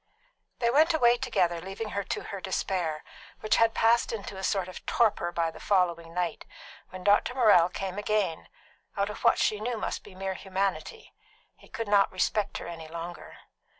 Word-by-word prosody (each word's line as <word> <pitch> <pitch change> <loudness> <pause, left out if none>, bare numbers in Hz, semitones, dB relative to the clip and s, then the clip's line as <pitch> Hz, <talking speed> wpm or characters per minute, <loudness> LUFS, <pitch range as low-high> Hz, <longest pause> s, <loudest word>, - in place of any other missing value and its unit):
They 235 -1 +1
went 315 +5 +4
away 240 -5 +4
together, 185 -9 0
leaving 195 +4 -6
her 200 -1 -2
to - - -3
her 200 - -7
despair, 180 -5 -2 0.4
which 215 +1 +2
had 230 0 +3
passed 230 +1 +3
into 205 -3 -6
a 190 - -7
sort 190 -2 0
of 185 - -9
torpor 210 -7 +2
by 165 -1 -1
the - - -13
following 170 -4 +1
night, 175 -1 -2 0.5
when 185 0 -9
Dr. 205 +5 +3
Morrell 205 -9 +5
came 190 +1 -4
again, 205 -6 -1 0.5
out 200 +1 0
of - - -10
what 235 - +5
she 210 - +1
knew 235 +2 -2
must - - -4
be 185 - -14
mere 190 0 -3
humanity; 190 - -3 0.4
he - - -19
could 230 -1 -5
not 200 -1 +4
respect 200 +2 0
her - - -7
any 165 -2 -8
longer. 170 +1 -8
195 Hz, 185 wpm, -28 LUFS, 175-220 Hz, 0.5 s, Morrell